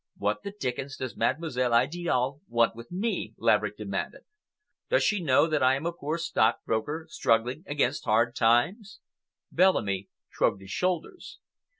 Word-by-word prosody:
"What 105 +1 -1
the - - -5
dickens 135 -7 -4
does 130 -2 -5
Mademoiselle 130 -7 0
Idiale 140 0 0
want 115 -1 +2
with 115 +1 -11
me?" 205 +6 -2
Laverick - - +2
demanded. - - -4 0.7
"Does - - +3
she 210 -3 +1
know 140 -2 +4
that 155 -2 0
I 130 +1 +4
am 140 +4 -5
a 170 - -1
poor 155 0 -3
stockbroker, 145 +1 0
struggling 120 +7 0
against 145 -2 0
hard 115 +2 +2
times?" 180 - +1 0.5
Bellamy 100 - +2 0.2
shrugged 95 - 0
his 95 0 -11
shoulders. 185 - -3
135 Hz, 140 wpm, -27 LUFS, 115-170 Hz, 0.7 s, know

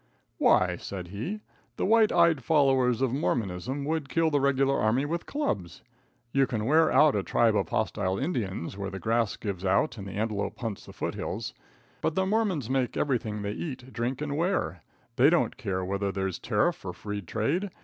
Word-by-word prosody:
"Why," - - +4
said 90 -3 -7
he, 140 - -4 0.3
"the - - -1
white 220 +1 +5
eyed 170 -6 +4
followers 135 -4 +3
of 130 -2 +1
Mormonism 125 - -1
would 155 -2 -2
kill 165 -1 +2
the 145 - +3
regular 135 0 +2
army 115 +6 +2
with 170 +3 -3
clubs. 100 - -3 0.5
You 135 0 +3
can 110 -3 -2
wear 155 +5 +4
out 150 -4 +5
a 100 - +1
tribe 115 +3 +2
of - - 0
hostile 100 -3 0
Indians 100 - -2
when 100 0 -4
the - - -3
grass 115 +3 +1
gives 100 -4 -4
out 100 +3 +1
and 100 - -7
the 95 - -7
antelope 105 0 -2
hunts 110 -5 -5
the - - -9
foothills, - - -4 0.5
but 160 - 0
the 190 - +2
Mormons 195 - 0
make 130 -1 0
everything 110 -7 -1
they 100 - -2
eat, 130 0 -6
drink 125 +4 -2
and 145 -1 -3
wear. 155 - 0 0.4
They 135 +4 +7
don't 175 0 +2
care 95 -8 -3
whether 100 +1 -1
there's 95 -2 -2
tariff 115 +9 0
or 90 -2 -4
free 105 +1 -5
trade. 140 - -1
120 Hz, 185 wpm, -28 LUFS, 100-150 Hz, 0.5 s, They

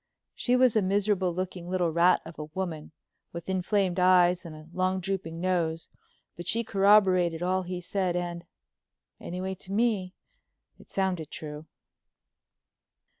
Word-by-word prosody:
She 245 - +1
was 250 -2 +4
a 215 - +4
miserable 195 -1 +1
looking 180 0 -5
little 180 -2 +1
rat 170 +3 +4
of 160 0 -10
a 150 - -4
woman, 160 -1 -5 0.4
with 170 -1 -7
inflamed 190 0 0
eyes 180 -1 +4
and 155 - -9
a 155 0 -12
long 185 +1 0
drooping 185 -3 -3
nose, 170 -3 -1 0.5
but 175 0 -8
she 230 +1 +1
corroborated 195 -5 +4
all 185 +1 +1
he 180 0 -5
said, 185 0 -1
and—anyway, 175 +1 -7
to 190 0 -11
me—it 215 - -4
sounded 185 -5 -1
true. 150 0 -7
185 Hz, 130 wpm, -28 LUFS, 170-190 Hz, 0.5 s, was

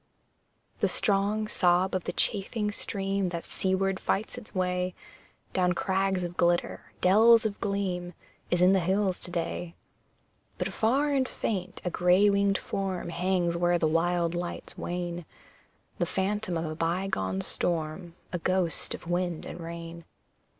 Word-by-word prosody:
The - - +3
strong 205 +1 +1
sob 180 -1 +2
of 185 -2 -1
the - - -1
chafing 210 +1 0
stream 195 -2 -1
That 170 -1 -4
seaward 190 0 +1
fights 210 +3 -1
its 240 -4 -9
way 180 0 0 0.6
Down 180 -1 +2
crags 190 0 0
of 175 0 -5
glitter, 175 0 +1
dells 220 +5 +6
of 205 -2 -2
gleam, 185 -3 -2 0.3
Is 175 0 +2
in 185 +1 +6
the 190 - +4
hills 190 +1 +1
to - - -10
day. 170 0 -3 0.8
But - - -1
far 270 +7 +2
and 265 -2 +1
faint, 185 -3 -3
a 180 - 0
grey 180 +4 +4
winged 200 0 +2
form 190 -3 -3
Hangs 175 0 0
where 175 0 +2
the 160 - +2
wild 170 +1 +1
lights 175 0 -3
wane 175 0 -4 0.8
The 175 - +1
phantom 195 -1 -1
of 165 - -2
a 155 - -3
bygone 165 - -1
storm, 170 - -2 0.2
A 180 - -1
ghost 185 -1 0
of - - -12
wind 175 -1 -1
and - - -7
rain. 170 0 -7
180 Hz, 150 wpm, -28 LUFS, 175-195 Hz, 0.8 s, dells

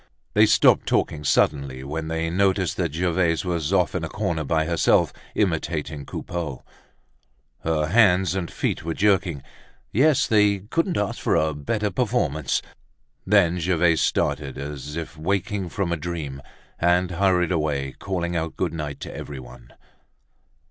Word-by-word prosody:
They - - +6
stopped - - +4
talking 75 -1 0
suddenly 70 -3 +1
when 80 +3 -4
they 80 0 -2
noticed 95 0 +1
that 85 -5 -1
Gervaise 85 -1 +1
was 85 -2 -1
off 90 -3 +2
in 90 - -2
a 80 - -3
corner 85 -6 -2
by 80 +2 +1
herself 85 +1 +2 0.2
imitating 80 -6 -1
Coupeau. 80 -7 -5 1.0
Her 80 -2 0
hands 95 -1 +4
and 95 -3 -3
feet - - -2
were 80 0 -3
jerking. 95 -8 +1 0.5
Yes, 140 +5 +4
they 105 -2 +3
couldn't 165 - -1
ask 105 - -1
for - - +1
a 80 0 +2
better 105 +9 -2
performance! 85 - 0 0.6
Then 90 -4 +4
Gervaise 85 -1 +2
started 70 -3 0
as 75 +1 -6
if 80 -1 -6
waking 95 +2 -1
from 95 -1 -2
a 85 - 0
dream 75 -5 -5 0.4
and 90 +1 +2
hurried 90 -1 +2
away 75 -5 -1
calling 85 -3 -2
out 80 -1 -3
good 85 -3 -1
night 75 -3 -5
to - - -7
everyone. 65 -4 -9
85 Hz, 145 wpm, -24 LUFS, 75-95 Hz, 1.0 s, They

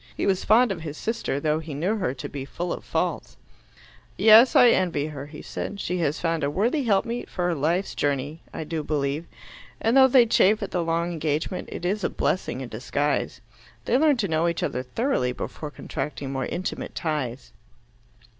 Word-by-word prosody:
He - - -1
was 190 -2 +1
fond 230 +2 +4
of 175 -4 -4
his 155 -2 -6
sister, 220 - -2
though 155 +1 +1
he 160 -3 -7
knew 185 +10 0
her 180 -10 -1
to 125 - -6
be 140 -2 -6
full 170 +6 -4
of - - -7
faults. - - -2 0.8
"Yes, 225 +3 +7
I 245 - +8
envy 170 -9 +1
her," 145 -2 -7
he 150 0 -10
said. 200 - -5
"She 180 -1 -2
has 150 -2 0
found 165 -2 -1
a 140 - +1
worthy 230 - +1
helpmeet 230 +3 0
for 180 -1 -1
life's 165 +6 0
journey, 145 +3 -2
I - - -5
do 155 0 -3
believe. 145 +1 -2 0.5
And 225 +3 +1
though 265 -1 +8
they 255 -2 +6
chafe 215 -1 +3
at 200 - -5
the 180 - 0
long 170 +1 0
engagement, 160 +2 -2
it 175 - -6
is 200 +3 -1
a - - +1
blessing 135 -8 -1
in 125 - -6
disguise. 140 +3 -2 0.4
They - - +1
learn 300 -3 +4
to 215 -4 0
know 160 0 +1
each 170 -1 -1
other 125 - -1
thoroughly 130 - -1
before 150 +4 -6
contracting 145 -1 -5
more 135 -1 -2
intimate 185 - -4
ties." 135 -7 -3
165 Hz, 190 wpm, -25 LUFS, 145-200 Hz, 0.8 s, I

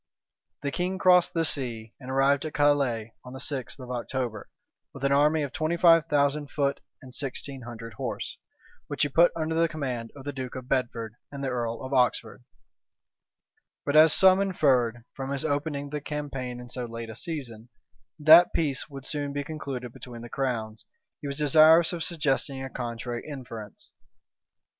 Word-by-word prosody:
The 140 - -1
king 180 +4 -2
crossed 180 -2 +4
the 165 -1 +2
sea, 115 -7 -1
and 130 -1 -10
arrived 135 +1 +3
at 155 - -6
Calais 140 -6 +2
on 125 - -10
the 130 - -7
sixth 135 -1 -3
of 125 -1 -8
October, 120 -3 -4 0.5
with 135 - -9
an 140 - +2
army 150 +2 +3
of 140 - -4
twenty 160 +3 -1
five 165 -2 +6
thousand 145 0 +1
foot 140 -1 0 0.2
and 130 -1 -12
sixteen 135 0 -4
hundred 115 -1 -8
horse, - - -5 0.5
which - - -1
he 145 - +1
put 170 +5 +5
under 160 0 -2
the 165 +1 +3
command 125 -8 -4
of 140 -1 -11
the 145 - -4
duke 130 -2 -6
of 130 -1 -7
Bedford 120 -4 -1 0.2
and 140 -1 -6
the 135 - -1
earl 120 -2 -3
of 130 +1 -5
Oxford: 125 -2 +1 1.4
but 145 - 0
as 155 +1 +8
some 190 0 +6
inferred, 130 -11 +2
from 135 0 -5
his 140 +1 -1
opening 145 -1 -2
the 150 -1 -3
campaign 135 -4 -5
in 125 - -9
so 125 0 -5
late 115 -1 -7
a - - -10
season, 120 -5 -6 0.5
that 160 +3 +7
peace 145 -3 -1
would 135 -2 -9
soon 145 -2 -3
be 145 0 -2
concluded 135 -5 -6
between 120 -2 -10
the 120 - -9
crowns, 115 -5 -3 0.4
he 145 - -5
was 140 0 -4
desirous 155 +3 +6
of 170 -2 -3
suggesting 140 -5 -1
a 135 - -6
contrary 120 0 -4
inference. 115 -7 -9
140 Hz, 175 wpm, -27 LUFS, 125-150 Hz, 1.4 s, as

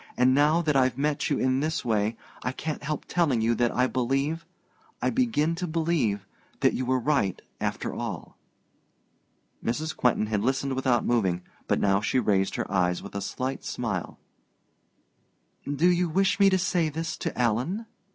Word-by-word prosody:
And 125 +1 +5
now 150 +5 +4
that 150 -3 +1
I've 130 -2 +3
met 145 +1 0
you - - +1
in 130 0 +1
this 155 -1 -1
way, 110 -1 +1 0.2
I 125 - -2
can't 155 +2 -4
help 150 0 -3
telling 155 -9 +1
you 115 +1 +2
that 120 +1 +2
I 125 - +2
believe 135 +6 -1 0.5
I - - +1
begin 220 - +1
to 180 0 -2
believe 155 - 0 0.4
that - - +4
you 130 - -2
were 130 0 +3
right, 130 - +1 0.2
after - - -2
all." - - -5 1.3
Mrs. 155 +7 -2
Quentin 125 -3 +2
had 105 -1 -1
listened 135 +3 0
without 130 -2 +1
moving; 95 -7 +1 0.2
but - - +2
now 100 0 +3
she 110 +4 0
raised 95 -6 +2
her - - -3
eyes 90 -2 +1
with 100 - -9
a 100 - -3
slight 130 +6 -3
smile. 105 -8 -3 1.5
"Do 150 +5 +3
you 180 -1 +3
wish 195 +5 +2
me 200 -1 +7
to 190 - +3
say 175 -3 +1
this 165 +2 -3
to - - -4
Alan?" 125 - 0
130 Hz, 170 wpm, -27 LUFS, 115-160 Hz, 1.5 s, me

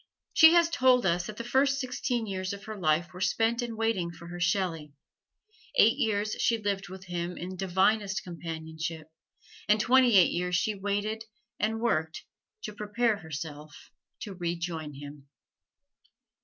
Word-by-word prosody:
She 320 0 +8
has 340 -1 +5
told 255 -6 +4
us 175 0 +1
that 215 - -8
the 235 - -4
first 275 +3 +2
sixteen 245 -2 -2
years 185 -1 -3
of 200 0 -9
her 220 0 -7
life 170 -2 0
were 180 - -9
spent 225 +5 +1
in 235 -2 -5
waiting 225 -6 0
for 170 0 -11
her 175 0 -7
Shelley, 170 -4 -1 0.8
eight 225 +4 +6
years 210 -2 0
she 230 - +2
lived 200 -3 -3
with 190 0 -9
him 175 0 -4
in 185 +2 -6
divinest 195 +2 +1
companionship, 160 -2 -6 0.6
and 210 +1 +5
twenty 250 -1 +5
eight 180 - +6
years 180 +1 -1
she 215 +5 +1
waited 205 +2 -2 0.3
and 220 +1 0
worked 160 -8 -1 0.4
to 210 - -5
prepare 210 +2 0
herself 150 -3 -8 0.3
to 205 - -6
rejoin 170 -4 -4
him. 145 0 -10
190 Hz, 155 wpm, -28 LUFS, 170-220 Hz, 0.8 s, She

